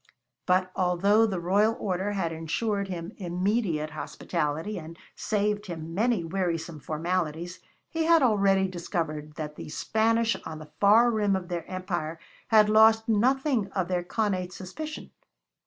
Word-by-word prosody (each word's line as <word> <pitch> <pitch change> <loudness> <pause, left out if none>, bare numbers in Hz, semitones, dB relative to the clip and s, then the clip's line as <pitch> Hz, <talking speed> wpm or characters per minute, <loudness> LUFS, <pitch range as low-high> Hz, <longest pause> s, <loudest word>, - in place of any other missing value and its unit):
But 185 0 +2
although 195 +5 +3
the 190 -4 -2
royal 205 +6 +2
order 195 +1 -1
had 180 -5 -1
insured 195 +6 -2
him 175 -3 -5
immediate 180 -3 -1
hospitality 160 +4 -3
and 165 +1 -10 0.2
saved 210 0 -1
him 165 -2 -6
many 220 0 +1
wearisome 170 -2 -2
formalities, 170 +2 -3 0.3
he 325 -1 -2
had 330 -2 +5
already 195 -4 +3
discovered 165 -4 -4
that 150 -1 -6
the - - -8
Spanish 225 +7 +1
on 160 -1 -6
the 155 -1 -12
far 225 +4 +6
rim 205 -3 +1
of 185 -1 -4
their 175 -1 -4
empire 175 -4 -3 0.3
had 215 -2 +6
lost 220 +1 +5
nothing 250 +1 +2
of 185 -2 -1
their 180 -1 0
connate 185 -2 -1
suspicion. 305 +14 -7
185 Hz, 140 wpm, -27 LUFS, 170-215 Hz, 0.3 s, far